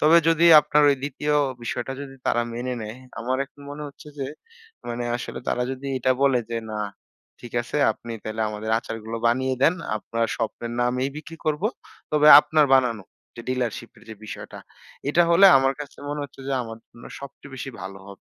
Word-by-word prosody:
তবে 155 +3 +6
যদি 165 +1 +4
আপনার 150 0 +2
ওই 140 - +2
২য় 145 +1 -1 0.3
বিষয়টা 135 +3 -3
যদি 135 -1 -8
তারা 120 - +2
মেনে 125 +1 -3
নেয়, 110 +3 -7 0.2
আমার 130 +3 -1
এখন 145 - -22
মনে 145 +1 -7
হচ্ছে 140 +2 -14
যে, 135 - -2 0.6
মানে 120 0 -3
আসলে - - -6
তারা 125 - 0
যদি 135 +1 -7
এটা 130 +1 +2
বলে 135 -3 +4
যে, 115 - -1
না 105 - -4 0.6
ঠিক 120 - -10
আছে 120 - -5 0.2
আপনি 115 +1 -9
তাহলে 110 +1 -2
আমাদের 110 +1 -5
আচারগুলো 115 -1 -6
বানিয়ে 130 +2 +1
দেন। 165 - +5 0.2
আপনার 115 +1 -2
স্বপ্নের 115 +1 -4
নামেই 125 +2 0
বিক্রি 165 +2 -9
করব। 155 +3 0 0.5
তবে 150 0 +5
আপনার 155 -1 +3
বানানো 120 -6 +2 0.3
যে 115 - -7
ডিলারশিপের 120 -2 -3
যে 110 - -7
বিষয়টা। - - -8 0.5
এটা 170 +4 +4
হলে 190 +4 +8
আমার 135 0 +2
কাছে 145 - -9
মনে 145 0 -3
হচ্ছে 135 -1 -13
যে, - - -1
আমার 115 -1 -8
জন্য 120 - -15 0.2
সবচেয়ে 140 0 -11
বেশি 135 +1 -6
ভালো 95 0 -7
হবে। 100 -1 -13
130 Hz, 185 wpm, -24 LUFS, 115-145 Hz, 0.6 s, হলে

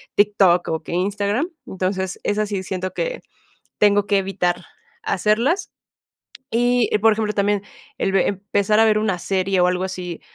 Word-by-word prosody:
TikTok 195 -4 +3
o 160 -1 -2
que - - -7
Instagram. 205 - 0 0.2
Entonces, 190 0 -3
es 205 - -1
así, 205 -2 -1
siento 185 0 -4
que - - -3 0.6
tengo 205 -1 +4
que 205 - +3
evitar 180 -2 -1 0.4
hacerlas. 235 - 0 0.8
Y, 245 0 +2
por 220 +1 +4
ejemplo, 215 0 -1
también, 205 0 +1 0.3
el 195 - 0
ve 190 -2 +3
empezar 205 +1 0
a 225 - +6
ver 215 -1 +3
una 215 -4 0
serie, 190 +1 0
o 180 - +5
algo 180 0 0
así, 180 -2 -5
200 Hz, 155 wpm, -21 LUFS, 185-215 Hz, 0.8 s, a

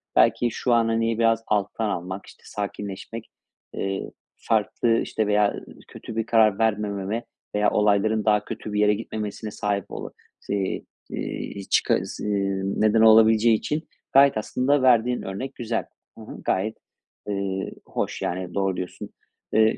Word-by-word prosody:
Belki 115 +1 +4
şu 125 - 0
an, 115 -1 +4
hani, 115 0 0
biraz 115 -1 +3
alttan 105 +1 0
almak, 95 +1 -4
işte, - - -17
sakinleşmek, 105 +2 -6 0.4
eee, 95 0 -3 0.3
farklı, 115 +1 +1
işte, 110 - -1
veya, 105 0 +3
ııı, - - -7 0.2
kötü 115 - -9
bir 115 -1 0
karar 110 -3 +4
vermememe 105 0 0 0.3
veya 105 0 +3
olayların 105 +1 +2
daha 105 -1 +3
kötü 110 -2 -6
bir 105 - 0
yere 105 0 +5
gitmemesine 105 0 -5
sahip 100 -2 -1
olu" - - -7 0.3
sii 100 -2 -2 0.2
iii, 100 -1 -5
çıka - - +3
zı - - -6
eee, 100 -1 0
neden 105 +3 +2
olabileceği 110 0 +6
için 155 +7 -3 0.3
gayet 135 -2 +6
aslında 130 +6 +1
verdiğin 125 -1 +4
örnek 100 +8 -5
güzel. 115 -1 -2 0.3
Hı - - -11
hı, - - -9
gayet, 110 +4 0 0.5
ııı, 100 -1 -2 0.2
hoş, - - -3
yani, 90 0 -3
doğru 95 -2 0
diyorsun. 90 - -6 0.4
Iıı, 110 0 +4
105 Hz, 150 wpm, -24 LUFS, 100-115 Hz, 0.5 s, olabileceği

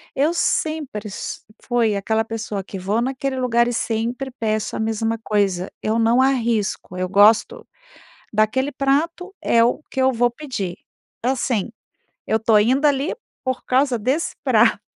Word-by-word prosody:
eu 295 +5 +2
sempre 305 -11 -1
s 200 - -6 0.2
fui 235 -4 +1
aquela 220 +3 0
pessoa 220 -3 -4
que 195 0 -7
vou 205 +5 0
naquele 265 +1 -2
lugar, 235 -1 +2
e 245 - -1
sempre 235 +4 -2
peço 215 -3 -2
a - - -3
mesma 225 +1 -1
coisa, 195 -4 0
eu 220 +2 +1
não 230 +2 +3
arrisco, 230 -8 0
eu 185 0 -1
gosto 205 +4 +4 0.6
daquele 215 +6 +1
prato 320 +8 -1
é 230 0 +4
o 245 +5 0
que 265 - -1
eu 260 0 +4
vou 240 0 +2
pedir. 235 - -5 0.5
Assim, 245 -4 0 0.6
eu 220 - +2
tô 220 -1 +4
indo 260 +7 +2
ali, 285 +2 +1 0.3
por 260 -1 -3
causa 260 -1 +2
desse 260 +9 -1
prato. 225 -5 +3
235 Hz, 150 wpm, -21 LUFS, 215-265 Hz, 0.6 s, gosto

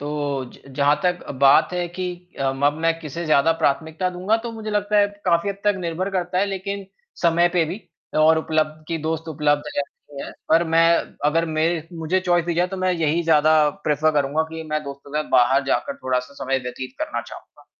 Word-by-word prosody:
तो, 145 -2 -2
ज - - -17 0.2
जहाँ 145 +1 +4
तक 180 0 +1
अ, - - -3
बात 135 +5 +4
है 180 -1 -1
कि 180 +1 -4 0.3
अ, 135 -1 +1
म 135 - -7
अब 145 - +4
मैं 165 0 +2
किसे 165 +2 -5
ज़्यादा 155 +1 +4
प्राथमिकता 160 +6 0
दूँगा, 185 +5 +1
तो 230 +1 -6
मुझे 220 -1 -6
लगता 210 0 +1
है, 205 - +5 0.2
काफ़ी 170 +2 +2
हद 195 - -6
तक 205 0 +4
निर्भर 175 +3 -2
करता 180 -1 -1
है 200 - +2
लेकिन 200 0 -4 0.4
समय 170 0 +4
पे 170 - +4
भी 175 +7 -5 0.4
और 160 +1 +5
उपलब्ध 155 -1 -1
कि 165 - -1
दोस्त 160 0 -3
उपलब्ध 145 -1 +1
रहती 140 0 -6
है - - -7 0.2
पर 165 +2 +4
मैं 165 0 +6 0.4
अगर 165 +2 +2
मेरे 160 0 +1
मुझे 165 +3 -1
चॉइस 175 -2 +2
दी 170 - 0
जाए, 175 +2 +2
तो 190 - -5
मैं 185 0 +1
यही 165 0 +1
ज़्यादा 155 -1 +4 0.2
प्रेफर 150 +1 +2
करूँगा 140 +3 0
कि 160 0 -5
मैं 155 0 0
दोस्तों 140 0 -9
के 150 - 0
साथ - - -15
बाहर 135 +3 +4
जाकर 280 - -1
थोड़ा-सा 130 +1 -1
समय 135 0 +1
व्यतीत 125 +1 -6
करना 310 0 -2
चाहूँगा। - - -14
160 Hz, 210 wpm, -22 LUFS, 150-180 Hz, 0.4 s, मैं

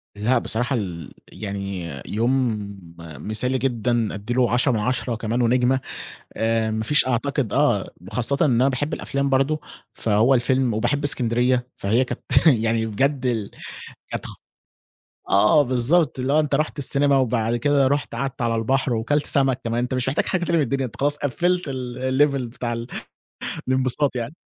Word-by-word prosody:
لأ 110 +5 +1
بصراحة 120 +4 -1
ال 85 - -5
يعني 100 -4 -5 0.2
يوم 120 +1 +1 0.4
مثالي 105 - -3
جدًا 120 -3 0
أدّي 105 +4 -4
له 125 -1 +2
10 125 +3 +3
من 115 - 0
10 125 +2 -1
كمان 115 +2 -2
ونجمة، 125 +2 +2 0.6
آآ، 115 0 +1
ما 110 0 -2
فيش 150 +4 +3
أعتقد 130 0 -1
آه، - - +1 0.2
وخاصةً 120 +7 -1
إن - - +2
أنا 130 - +4
باحب 140 +3 -2
الأفلام 140 0 -2
برضه، 135 +3 +1 0.3
فهو 110 +5 +3
الفيلم 125 -1 +2
وباحب 125 +6 0
إسكندرية 125 -2 +1
فهي 115 +6 +1
كانت - - -6 0.3
يعني 115 -5 +3
بجد 135 +5 0
ال 110 -5 -1 0.6
كانت - - -4
خ - - -8 0.9
آه 105 +10 +5
بالضبط، 135 +4 +1
اللي 130 +2 0
هو 155 - +5
أنت 150 -2 +1
رُحت 155 +1 -1
السينما 140 +1 +2
وبعد 115 -3 +1
كده 140 +2 +2
رُحت 145 -3 -1
قعدت 135 +1 -4
على 115 -1 +1
البحر، 130 +3 0
وكلت 140 +6 0
سمك 135 -2 +1
كمان، 115 0 -1
أنت 125 +2 -2
مش 125 -1 -1
محتاج 140 - 0
حاجة 180 -2 -1
تانية 170 - +1
من 155 - +3
الدنيا 135 +1 -1
أنت 120 - -10
خلاص 145 +1 +1
قفّلت 175 +6 0
ال 125 -2 -5 0.2
ال 150 - +6
level 140 -1 -2
بتاع 120 -1 -3
ال 115 +1 -5 0.8
الانبساط 130 +1 +2
يعني 120 +5 -4
125 Hz, 170 wpm, -22 LUFS, 115-140 Hz, 0.9 s, ال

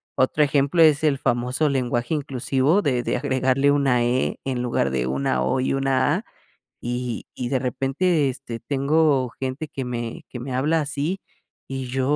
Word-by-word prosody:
otro 140 +3 +3
ejemplo 140 +3 +2
es 155 -1 +4
el 145 -3 +3
famoso 125 +5 +1
lenguaje 125 0 -1
inclusivo 135 +5 +1
de 125 -6 0
de - - -1
agregarle 135 +1 +2
una 135 -4 +2
e 125 +2 0
en 130 -2 -1
lugar 120 - 0
de 65 -1 -1
una 65 -1 0
o, 130 - +1
y 130 - 0
una 135 +2 +2
a. 220 - -7 0.6
Y 120 -1 -3
y 125 -1 -4
de 135 - +1
repente 135 +5 +1
este, 125 -3 -6
tengo 140 -1 +2
gente 135 +4 -3
que 135 -2 -5
me 120 -2 -5
que 125 - -7
me 125 +2 -5
habla 155 +5 +2
así 150 +6 -2 0.5
y 135 -1 -4
yo 130 +2 -2
135 Hz, 175 wpm, -23 LUFS, 125-145 Hz, 0.6 s, es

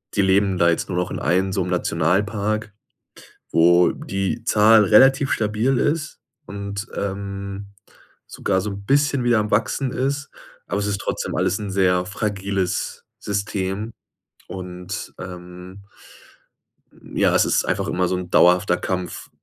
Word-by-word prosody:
die 105 - +3
leben 95 0 +2
da 85 -1 +4
jetzt 85 - -1
nur 90 - -2
noch 90 0 -1
in - - -4
einem 95 +2 +1
so 95 - 0
'nem 90 - -4
Nationalpark, 100 +6 0 0.8
wo 85 +2 +5
die 95 +4 -3
Zahl 110 -1 +5
relativ 135 - +5
stabil 110 +5 +1
ist 155 +1 -1 0.3
und, 100 +2 -6
ähm, 100 0 -5 0.6
sogar 95 -1 -1
so 105 +2 -4
'n 100 0 -8
bisschen 140 +1 +2
wieder 120 -2 +3
am 105 0 -2
Wachsen 125 +5 0
ist, 140 +2 -2 0.4
aber 100 - -1
es 100 - -1
ist 100 -1 -2
trotzdem - - -3
alles 95 - 0
'n 105 -2 -5
sehr 90 -2 +2
fragiles 100 -2 -3
System 100 +1 -3 0.5
und, 90 +1 -7
ähm 90 +1 -10 1.2
ja, - - 0
es - - +4
ist - - +2
einfach - - -1
immer 90 0 0
so 90 - -1
'n 90 -1 -6
dauerhafter 90 +1 +4
Kampf, 90 -2 -4
100 Hz, 145 wpm, -22 LUFS, 90-105 Hz, 1.2 s, wo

